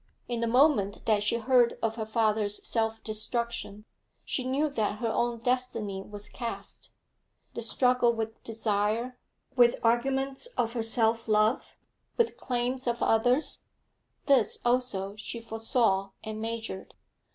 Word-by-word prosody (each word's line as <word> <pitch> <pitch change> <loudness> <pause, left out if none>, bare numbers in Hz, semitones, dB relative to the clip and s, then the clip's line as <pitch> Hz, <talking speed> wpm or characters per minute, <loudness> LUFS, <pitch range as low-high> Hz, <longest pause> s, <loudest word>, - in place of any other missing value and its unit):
In 240 -1 -2
the 230 - 0
moment 245 -5 +3
that 215 -2 +3
she 215 +3 +2
heard 240 0 +3
of 225 -1 +1
her 220 -1 -5
father's 215 -2 0
self 225 -1 0
destruction, 215 -1 -2 0.4
she 260 - -1
knew 270 +4 +1
that 220 -7 -1
her 230 +1 -2
own 235 +1 -1
destiny 245 -6 -1
was 205 +1 -7
cast; 235 -2 -6 0.6
the - - -5
struggle 250 +1 +3
with 225 -1 -5
desire, 225 +2 -1 0.4
with 240 -2 +5
arguments 265 - +1
of 230 -1 0
her 235 - -1
self 225 0 +2
love, 215 +2 +1 0.4
with 470 -1 +2
claims 250 +1 -2
of 235 0 0
others, 245 +6 +2 0.7
this 260 -7 +3
also 240 -6 0
she 220 +2 -5
foresaw 225 -3 +1
and 215 -1 -5
measured. 225 -3 -5
230 Hz, 135 wpm, -28 LUFS, 215-250 Hz, 0.7 s, with